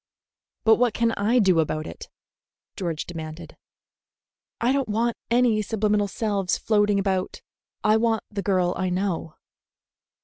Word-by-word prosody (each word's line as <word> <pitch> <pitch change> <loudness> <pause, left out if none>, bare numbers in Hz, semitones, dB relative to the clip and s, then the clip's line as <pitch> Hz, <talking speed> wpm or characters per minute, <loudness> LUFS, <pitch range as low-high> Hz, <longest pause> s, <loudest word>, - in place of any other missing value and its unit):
"But 220 0 +5
what 245 -2 +2
can 230 -1 +2
I 225 +4 +1
do 190 -7 +4
about 155 0 -1
it?" - - -9 0.7
George 170 -5 -3
demanded. 160 -1 -8 1.0
"I 240 +2 +2
don't 275 -3 0
want 230 +2 0
any 235 -3 +3
subliminal 210 -1 0
selves 200 -2 -1
floating 210 -2 +2
about. 190 -2 -1 0.4
I 215 +1 +4
want 225 -1 +1
the 205 -1 -3
girl 185 -3 +1
I 185 -1 -1
know." 180 -4 -2
205 Hz, 135 wpm, -24 LUFS, 185-225 Hz, 1.0 s, But